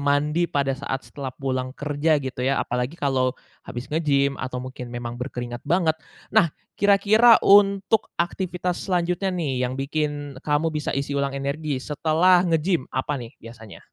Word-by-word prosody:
mandi 150 Hz, +4 st, +2 dB
pada 140 Hz, -5 st, 0 dB
saat 135 Hz, -1 st, -5 dB
setelah 135 Hz, -3 st, -6 dB
pulang 130 Hz, -1 st, -3 dB
kerja 145 Hz, +2 st, 0 dB
gitu 130 Hz, -2 st, -4 dB
ya 135 Hz, +1 st, +2 dB
apalagi 125 Hz, +4 st, -2 dB
kalau, 135 Hz, -5 st, 0 dB, 0.3 s
habis 120 Hz, +1 st, -7 dB
nge-gym 140 Hz, -3 st, +1 dB
atau 125 Hz, -1 st, -4 dB
mungkin 125 Hz, -1 st, -8 dB
memang 120 Hz, 0 st, -5 dB
berkeringat 120 Hz, -1 st, -6 dB
banget. 160 Hz, 0 st, +2 dB, 0.3 s
Nah, 195 Hz, -9 st, +3 dB, 0.2 s
kira-kira 210 Hz, +3 st, +5 dB
untuk 200 Hz, +1 st, +4 dB
aktivitas 180 Hz, 0 st, -2 dB
selanjutnya 180 Hz, +1 st, 0 dB
nih 140 Hz, -8 st, -1 dB
yang 130 Hz, +2 st, -3 dB
bikin 145 Hz, -1 st, -3 dB
kamu 150 Hz, +2 st, +1 dB
bisa 150 Hz, -2 st, -3 dB
isi 140 Hz, +1 st, -2 dB
ulang 140 Hz, -1 st, 0 dB
energi 140 Hz, 0 st, -3 dB
setelah 165 Hz, +6 st, +3 dB
nge-gym 165 Hz, -3 st, +1 dB
apa 145 Hz, +3 st, -1 dB
nih 120 Hz, -3 st, -8 dB
biasanya? 115 Hz, -2 st, -12 dB
145 Hz, 150 wpm, -24 LUFS, 130-170 Hz, 0.3 s, kira-kira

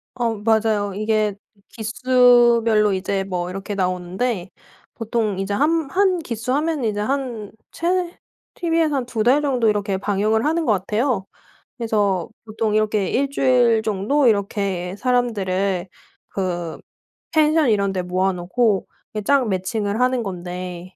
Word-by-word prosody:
어 235 Hz, -2 st, 0 dB
맞아요. 215 Hz, -2 st, +1 dB
이게 215 Hz, -1 st, 0 dB, 0.3 s
기수별로 235 Hz, -2 st, +3 dB
이제 195 Hz, +1 st, -1 dB
뭐 180 Hz, -2 st, -3 dB
이렇게 195 Hz, +2 st, -5 dB
나오는데 185 Hz, +2 st, -2 dB, 0.5 s
보통 220 Hz, -3 st, -1 dB
이제 195 Hz, +1 st, -2 dB
한 310 Hz, +5 st, +1 dB
한 380 Hz, -1 st, +3 dB
기수 245 Hz, -4 st, -3 dB
하면 310 Hz, -2 st, -1 dB
이제 210 Hz, -2 st, -1 dB
한 240 Hz, -3 st, -3 dB, 0.2 s
최 355 Hz, +1 st, -1 dB, 0.4 s
티비에서 330 Hz, -3 st, +1 dB
한 260 Hz, -3 st, -1 dB
2 225 Hz, -3 st, -2 dB
달 265 Hz, +5 st, +4 dB
정도 250 Hz, -5 st, +2 dB
이렇게 205 Hz, -2 st, 0 dB
방영을 210 Hz, +3 st, 0 dB
하는 325 Hz, +2 st, +1 dB
것 -, -, +2 dB
같아요. 210 Hz, +2 st, 0 dB, 0.5 s
그래서 205 Hz, -6 st, 0 dB, 0.2 s
보통 215 Hz, 0 st, -2 dB
이렇게 215 Hz, -2 st, +1 dB
1 275 Hz, +2 st, 0 dB
주일 245 Hz, -5 st, +3 dB
정도 220 Hz, +8 st, +1 dB
이렇게 195 Hz, -4 st, 0 dB
사람들을 200 Hz, -7 st, 0 dB, 0.4 s
그 175 Hz, -4 st, -3 dB, 0.5 s
펜션 310 Hz, -2 st, +3 dB
이런 200 Hz, -2 st, +1 dB
데 185 Hz, -, -1 dB
모아 185 Hz, +2 st, 0 dB
놓고 195 Hz, +4 st, 0 dB, 0.3 s
이게 215 Hz, -1 st, -3 dB
짝 275 Hz, 0 st, +3 dB
매칭을 200 Hz, +3 st, -2 dB
하는 250 Hz, -1 st, +2 dB
건데 180 Hz, -1 st, -6 dB
215 Hz, 265 characters per minute, -21 LUFS, 195-250 Hz, 0.5 s, 달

